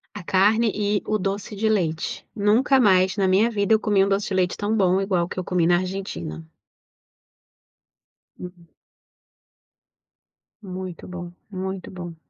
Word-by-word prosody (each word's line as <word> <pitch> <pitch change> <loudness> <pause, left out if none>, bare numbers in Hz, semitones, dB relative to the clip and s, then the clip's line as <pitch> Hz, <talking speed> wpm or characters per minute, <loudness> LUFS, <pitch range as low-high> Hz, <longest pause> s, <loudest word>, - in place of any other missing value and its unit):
A 205 - -7
carne 210 +5 +3
e 205 -1 0
o 215 - 0
doce 200 +1 -3
de 215 +2 0
leite. 170 -7 -1
Nunca 230 +6 +3
mais 190 -4 +3
na 195 -2 +2
minha 200 +5 +3
vida 205 0 +1
eu 220 - +4
comi 205 -3 +2
um 200 - -2
doce 200 +1 0
de 195 - -3
leite 180 -1 +1
tão 210 +2 -1
bom 190 -2 +2
igual 185 -3 0
o - - -12
que - - -8
eu 185 - -2
comi 175 -2 +1
na 175 0 +4
Argentina. 85 - -5 1.9
Hum. 180 -1 -10 1.9
Muito 185 -3 -7
bom, 175 -1 -7 0.2
muito 190 0 -5
bom. 175 -3 -8
190 Hz, 155 wpm, -23 LUFS, 180-205 Hz, 1.9 s, eu